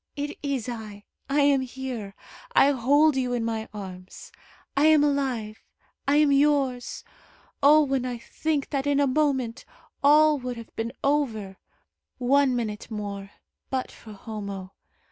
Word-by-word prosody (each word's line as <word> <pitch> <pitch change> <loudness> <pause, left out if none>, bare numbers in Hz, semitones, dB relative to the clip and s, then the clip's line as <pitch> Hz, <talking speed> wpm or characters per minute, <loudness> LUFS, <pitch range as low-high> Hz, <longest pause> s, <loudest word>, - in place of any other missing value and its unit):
It 290 0 -5
is 275 -5 -2
I. 215 -4 -7 0.3
I 290 +1 +3
am 280 -1 +4
here. 250 -6 -6 0.4
I 280 - +6
hold 285 +4 +3
you 250 -2 0
in 235 -2 -1
my 225 -1 -3
arms. 185 -3 -9 0.4
I 285 +2 +4
am 310 -2 +6
alive. 255 -7 -1 0.5
I 280 - +3
am 300 -1 +4
yours. 275 -3 +1 0.6
Oh, 300 +2 +7
when 270 -3 0
I 250 -1 -3
think 295 +4 -3
that 280 -1 -1
in 285 -1 +2
a 285 - +4
moment 265 -4 0 0.4
all 300 +1 +6
would 250 -1 -5
have 230 - -11
been 225 +1 -3
over 225 -10 0 0.6
one 265 +1 +3
minute 215 -3 -4
more, 200 -2 -5 0.4
but 260 -1 -2
for 220 - -12
Homo! 200 -3 -7
260 Hz, 145 wpm, -26 LUFS, 220-285 Hz, 0.6 s, Oh